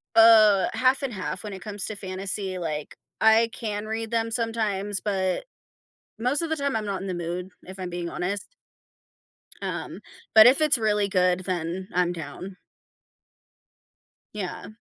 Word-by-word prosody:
uh, 215 -4 +7
half 260 +2 +3
and 260 - -2
half 185 -1 -4
when 210 - -6
it 190 - -8
comes 205 0 -4
to 215 - -5
fantasy, 190 0 -4
like, 155 -4 -4 0.3
I 220 +1 +5
can 210 -2 -4
read 220 +1 -4
them 230 -1 0
sometimes, 215 -4 -1
but 190 - -1 0.7
most 250 +7 +1
of 330 - -3
the 320 - 0
time 280 -2 -1
I'm 220 -1 -1
not 200 -2 -2
in 195 - -5
the 185 - -2
mood, 175 +1 -4 0.2
if 190 +1 -9
I'm 185 -1 -4
being 175 -1 -4
honest. 200 - -4 1.1
Um, - - -5 0.3
but 220 0 +10
if 260 +5 +6
it's 305 -4 +5
really 210 -2 +1
good, 180 -1 +2
then 180 +1 -3
I'm 180 0 +2
down. 175 +4 -8 1.8
Yeah. 180 -3 -5
200 Hz, 160 wpm, -25 LUFS, 185-225 Hz, 1.8 s, but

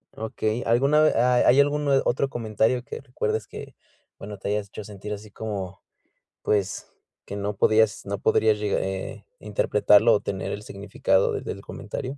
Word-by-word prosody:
Okey, 110 +1 -2
¿alguna 140 +6 +4
ve 155 - +5
ah, 125 +1 +3
hay 130 +3 +6
algún 145 +1 +2 0.2
otro 135 +3 +1
comentario 115 +1 0
que - - -8
recuerdes 110 -3 -3
que - - -10 0.4
bueno, 105 0 -8
te 100 - -5
hayas 105 -1 -1
hecho 105 - -9
sentir 105 0 -9
así 105 0 -7
como, 100 -4 -6 0.6
pues, 100 -3 -1 0.4
que 100 - -7
no 100 +1 -3
podías 110 -1 +3
no 100 0 -3
podrías 110 +2 +2
llegar, 105 -1 -1
eh, 95 0 -5
interpretarlo - - +3
o - - +2
tener - - -4
el - - -6
significado 480 -2 0
de 425 - -3
del - - -6
comentario? 135 +2 -6
110 Hz, 170 wpm, -25 LUFS, 100-125 Hz, 0.6 s, hay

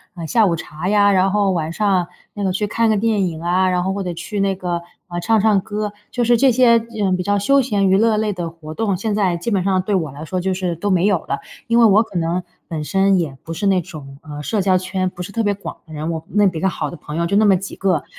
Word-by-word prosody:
呃， 165 -2 -6
下 225 +2 +3
午 170 -3 +1
茶 160 +4 -5
呀， 205 -1 +4
然 190 +1 +3
后 200 -2 +2
晚 165 -2 -2
上， 190 -2 +1 0.3
那 205 - -5
个 190 - +1
去 205 +3 -1
看 230 +1 +1
个 215 - +2
电 210 -2 +1
影 160 0 -8
啊， 185 +2 +2
然 180 -1 +1
后 190 - 0
或 200 -1 -3
者 175 -1 -3
去 195 +4 -4
那 195 -1 +1
个， 175 -2 -3 0.3
呃， 175 -1 -4
唱 220 +1 +2
唱 205 -2 +3
歌。 210 0 -4 0.2
就 245 - -2
是 240 +1 +4
这 260 +2 +4
些， 245 0 +5 0.3
呃， 190 -2 +2
比 180 - -2
较 205 +1 +1
休 275 +7 +3
闲 205 -6 +1
娱 190 - +4
乐 220 0 +3
类 210 -1 0
的 175 -2 -4
活 160 -2 -10
动。 200 -3 -1
现 210 +1 -2
在 185 -5 +1
基 175 +7 -4
本 195 -4 +1
上 190 -1 +1
对 200 +1 -1
我 160 -6 -1
来 145 +3 -8
说 185 +2 -3
就 190 +1 0
是 180 -2 -2
都 205 +5 -3
没 180 +1 +3
有 195 -5 +3
了。 140 - -4 0.3
因 235 +1 +3
为 230 - +7
我 215 +2 +5
可 190 - -7
能 170 +2 -1 0.2
本 155 -3 -4
身 195 +3 +2
也 140 -5 -3
不 165 - -6
是 200 +4 -1
那 190 -2 +3
种， 140 -4 -11
呃， 150 -1 -7
社 205 +6 -1
交 185 -1 +3
圈 185 0 -2
不 180 - -10
是 180 - -6
特 230 +1 -1
别 205 -1 +1
广 200 - -8
的 155 - -12
人， 155 +2 -4
我 160 -1 -4
那 205 -1 +3
比 170 -4 -2
较 190 - +1
好 180 - -2
的 175 - -9
朋 150 - -8
友， 170 - +1
就 200 +4 0
那 215 - +4
么 195 -2 +5
几 195 +1 -7
个。 185 -6 0
190 Hz, 310 characters per minute, -19 LUFS, 170-205 Hz, 0.3 s, 为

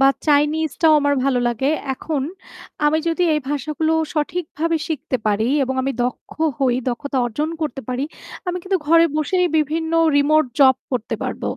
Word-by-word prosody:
বা 270 - +6 0.2
চাইনিজটাও 310 +2 +3
আমার 285 0 +2
ভালো 270 -2 +2
লাগে। 265 +5 0 0.2
এখন 290 +1 -3 0.6
আমি 310 +1 +3
যদি 335 +2 0
এই 300 - 0
ভাষাগুলো 305 +3 -1 0.2
সঠিকভাবে 325 +1 -1
শিখতে 300 -3 -2
পারি 215 +3 +1 0.2
এবং 265 - -3
আমি 270 +1 -1
দক্ষ 250 - -5 0.3
হই 255 -3 +2
দক্ষতা 265 +2 -2
অর্জন 295 +7 -2
করতে 270 -3 -3
পারি, 255 +2 -1 0.4
আমি 360 - -1
কিন্তু 380 -1 0
ঘরে 330 +2 +6
বসেই 360 +4 +1
বিভিন্ন 320 +2 -1 0.2
রিমোট 305 +2 +4 0.2
জব 265 -2 +7
করতে 245 -4 -2
পারব। - - -4
295 Hz, 155 wpm, -20 LUFS, 265-320 Hz, 0.6 s, জব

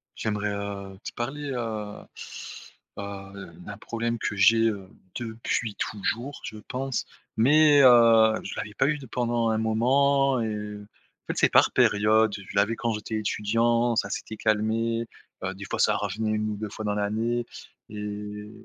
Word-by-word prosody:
J'aimerais, 105 -1 -2
heu, 100 -1 -6
te - - -5
parler, 140 +4 -4
heu 110 -4 -4 1.0
heu, 100 -2 -8
d'un 100 0 -7
problème 115 +1 -3
que 110 -2 -3
j'ai, 115 +3 +5
heu, 100 -3 -6 0.3
depuis 115 -1 -3
toujours, 120 +6 -3
je 110 - -7
pense, 135 -1 -3 0.3
mais 145 +4 +6
heu, 115 -3 +7
je - - -6
l'avais 105 - -5
pas 135 - +2
eu 150 +1 +1
de 140 - -10
pendant 120 -1 0
un 110 - +1
moment, 135 +4 +3
et 110 - -1
heu, 105 -1 -6 0.4
en - - -46
fait - - -12
c'est - - +4
par - - +5
période. 110 +1 +3
Je 100 0 -10
l'avais 100 +3 +2
quand 115 0 -1
j'étais 105 +1 -4
étudiant, 115 +3 +1
ça - - 0
s'était 110 - -5
calmé. 115 +2 0 0.4
Heu, 95 +1 -2
des 100 +1 -9
fois - - -2
ça - - +4
revenait 105 +2 -2
1 110 0 -1
ou - - -3
2 105 0 -5
fois 110 +2 -7
dans 105 0 0
l'année, 110 +4 -1 0.4
et 105 0 -6
110 Hz, 165 wpm, -26 LUFS, 105-120 Hz, 1.0 s, heu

